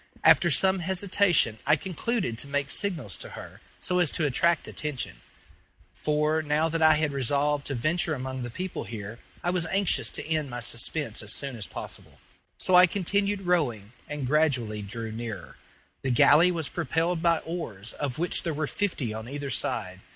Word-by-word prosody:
After -, -, +6 dB
some 190 Hz, 0 st, +4 dB
hesitation 180 Hz, -, +2 dB
I 150 Hz, +2 st, +4 dB
concluded 190 Hz, -, -2 dB
to 140 Hz, -, -3 dB
make 140 Hz, 0 st, -1 dB
signals 160 Hz, -, -1 dB
to -, -, -6 dB
her, -, -, -10 dB, 0.2 s
so 180 Hz, 0 st, -1 dB
as 175 Hz, -4 st, +3 dB
to 155 Hz, -, 0 dB
attract 165 Hz, +4 st, +2 dB
attention; 150 Hz, -5 st, -4 dB, 0.7 s
for, 150 Hz, +1 st, 0 dB
now 155 Hz, +1 st, +1 dB
that 165 Hz, +1 st, -1 dB
I 155 Hz, -1 st, +7 dB
had 150 Hz, -1 st, +1 dB
resolved 140 Hz, +2 st, 0 dB
to 140 Hz, -, -2 dB
venture 155 Hz, +6 st, 0 dB
among 130 Hz, 0 st, -5 dB
the 120 Hz, -, -4 dB
people 185 Hz, +10 st, -5 dB
here, 110 Hz, 0 st, -7 dB, 0.2 s
I 175 Hz, -, +1 dB
was 175 Hz, -2 st, 0 dB
anxious 165 Hz, -, +2 dB
to -, -, -7 dB
end 155 Hz, -2 st, -1 dB
my 120 Hz, 0 st, -5 dB
suspense 120 Hz, +1 st, -1 dB
as 105 Hz, 0 st, -1 dB
soon 135 Hz, -3 st, -4 dB
as 110 Hz, -4 st, -5 dB
possible. -, -, -8 dB, 0.4 s
So 185 Hz, -, -1 dB
I 180 Hz, +1 st, +9 dB
continued 200 Hz, +2 st, 0 dB
rowing, 125 Hz, -, 0 dB, 0.2 s
and 145 Hz, -2 st, -4 dB
gradually 130 Hz, -7 st, +1 dB
drew 110 Hz, +2 st, -6 dB
nearer. 110 Hz, -6 st, -7 dB, 0.4 s
The 135 Hz, -, -2 dB
galley 145 Hz, +7 st, +6 dB
was 165 Hz, -4 st, -2 dB
propelled 165 Hz, +2 st, -1 dB
by 170 Hz, 0 st, +3 dB
oars, 115 Hz, -, -6 dB
of 140 Hz, -4 st, -4 dB
which 175 Hz, +2 st, +2 dB
there 165 Hz, -3 st, -3 dB
were 155 Hz, +1 st, -1 dB
fifty 150 Hz, -, -2 dB
on 110 Hz, +2 st, -7 dB
either 140 Hz, 0 st, -5 dB
side. 95 Hz, -4 st, -1 dB
150 Hz, 180 wpm, -27 LUFS, 120-170 Hz, 0.7 s, I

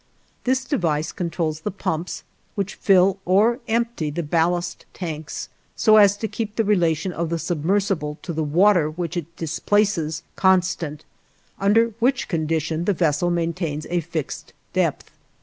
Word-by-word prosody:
This 260 Hz, +1 st, +1 dB
device 160 Hz, -, 0 dB
controls 165 Hz, -3 st, -2 dB
the 185 Hz, -, -3 dB
pumps 180 Hz, -3 st, -3 dB, 0.3 s
which 200 Hz, -1 st, -2 dB
fill 195 Hz, 0 st, +3 dB
or 215 Hz, +7 st, +3 dB
empty 230 Hz, -8 st, 0 dB
the 170 Hz, +4 st, -3 dB
ballast 170 Hz, +3 st, 0 dB
tanks, 155 Hz, -4 st, -5 dB, 0.3 s
so 215 Hz, -1 st, +5 dB
as 205 Hz, -1 st, +6 dB
to 220 Hz, -, -2 dB
keep 220 Hz, -1 st, -4 dB
the 225 Hz, -, +2 dB
relation 175 Hz, -4 st, +1 dB
of 165 Hz, -1 st, -2 dB
the 170 Hz, -, -1 dB
submersible 165 Hz, -2 st, -1 dB
to 170 Hz, -, -4 dB
the 160 Hz, 0 st, -1 dB
water 170 Hz, +1 st, +4 dB
which 170 Hz, +1 st, -4 dB
it 170 Hz, -1 st, -5 dB
displaces 165 Hz, -1 st, 0 dB
constant, 180 Hz, -5 st, +1 dB, 0.5 s
under 225 Hz, +3 st, +3 dB
which 250 Hz, +2 st, +1 dB
condition 160 Hz, 0 st, -1 dB
the 205 Hz, -, +2 dB
vessel 165 Hz, -1 st, +1 dB
maintains 165 Hz, -3 st, -2 dB
a 175 Hz, -, +2 dB
fixed 165 Hz, -3 st, -5 dB, 0.2 s
depth. -, -, 0 dB
175 Hz, 145 wpm, -23 LUFS, 160-200 Hz, 0.5 s, as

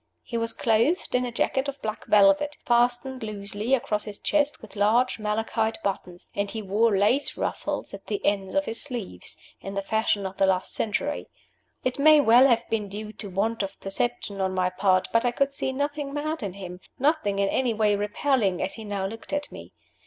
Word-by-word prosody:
He 235 Hz, -, -7 dB
was 230 Hz, 0 st, 0 dB
clothed 235 Hz, +11 st, +1 dB
in 250 Hz, 0 st, +2 dB
a -, -, -5 dB
jacket 265 Hz, +3 st, 0 dB
of 280 Hz, 0 st, -5 dB
black 215 Hz, 0 st, -4 dB
velvet, 205 Hz, +9 st, +4 dB
fastened 245 Hz, +2 st, +2 dB
loosely 210 Hz, +3 st, -1 dB
across 210 Hz, -4 st, -1 dB
his 205 Hz, -1 st, -6 dB
chest 295 Hz, -1 st, +1 dB
with 220 Hz, -1 st, -13 dB
large 225 Hz, +5 st, +2 dB
malachite 220 Hz, +1 st, -1 dB
buttons; 180 Hz, -3 st, -4 dB
and 200 Hz, 0 st, -1 dB
he 220 Hz, -, -4 dB
wore 210 Hz, +1 st, +2 dB
lace 220 Hz, +9 st, +2 dB
ruffles -, -, -3 dB
at -, -, -10 dB
the 405 Hz, -, -1 dB
ends 195 Hz, -2 st, 0 dB
of 290 Hz, 0 st, +2 dB
his 225 Hz, -, -2 dB
sleeves, 230 Hz, -, -6 dB, 0.2 s
in 195 Hz, 0 st, -7 dB
the 195 Hz, -, -1 dB
fashion 210 Hz, -1 st, 0 dB
of 190 Hz, 0 st, -5 dB
the 195 Hz, -, +3 dB
last 185 Hz, -1 st, +1 dB
century. 215 Hz, -, -2 dB, 0.6 s
It 255 Hz, +2 st, -1 dB
may 305 Hz, +1 st, +7 dB
well 250 Hz, 0 st, +7 dB
have 235 Hz, -2 st, +2 dB
been 215 Hz, -2 st, -1 dB
due 210 Hz, +2 st, -6 dB
to 205 Hz, -, -7 dB
want 210 Hz, +5 st, 0 dB
of 195 Hz, -1 st, -5 dB
perception 200 Hz, 0 st, -2 dB
on 190 Hz, 0 st, 0 dB
my 185 Hz, 0 st, +1 dB
part 185 Hz, 0 st, +2 dB
but 230 Hz, -, +4 dB
I 245 Hz, -, +3 dB
could 275 Hz, +3 st, 0 dB
see 265 Hz, -, -2 dB
nothing 285 Hz, +1 st, -3 dB
mad 310 Hz, +1 st, -2 dB
in 200 Hz, -4 st, -4 dB
him, 180 Hz, -2 st, -8 dB, 0.2 s
nothing 275 Hz, -8 st, +1 dB
in 200 Hz, 0 st, +2 dB
any 250 Hz, -3 st, +1 dB
way 210 Hz, -1 st, +3 dB
repelling, 205 Hz, -1 st, +1 dB
as 190 Hz, -, -1 dB
he 225 Hz, -, -8 dB
now 200 Hz, -2 st, -3 dB
looked 225 Hz, +4 st, -7 dB
at 290 Hz, 0 st, -2 dB
me. -, -, -10 dB
220 Hz, 205 wpm, -26 LUFS, 200-255 Hz, 0.6 s, may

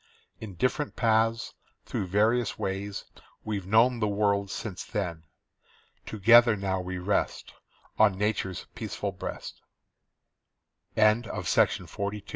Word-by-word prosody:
In 105 Hz, -4 st, -8 dB
different 130 Hz, -, -1 dB
paths, 115 Hz, 0 st, +1 dB, 0.3 s
through 95 Hz, -, -3 dB
various 110 Hz, +5 st, +1 dB
ways, 100 Hz, +1 st, -4 dB, 0.4 s
we've 100 Hz, -4 st, -4 dB
known 115 Hz, +4 st, +4 dB
the 105 Hz, -, +1 dB
world 100 Hz, -1 st, +1 dB
since 100 Hz, -2 st, -5 dB
then. 85 Hz, -7 st, -4 dB, 0.8 s
Together 115 Hz, +2 st, +6 dB
now 95 Hz, -2 st, -2 dB
we 90 Hz, 0 st, -5 dB
rest 90 Hz, +3 st, -2 dB, 0.5 s
On 105 Hz, -3 st, +5 dB
Nature's 100 Hz, -3 st, -2 dB
peaceful -, -, -4 dB
breast. -, -, -7 dB, 1.3 s
CHILDHOOD'S 110 Hz, -2 st, +2 dB
DAYS. -, -, +3 dB
TO -, -, -7 dB
M. 100 Hz, -, 0 dB
C. 105 Hz, -1 st, -8 dB
105 Hz, 120 wpm, -28 LUFS, 95-110 Hz, 1.3 s, Together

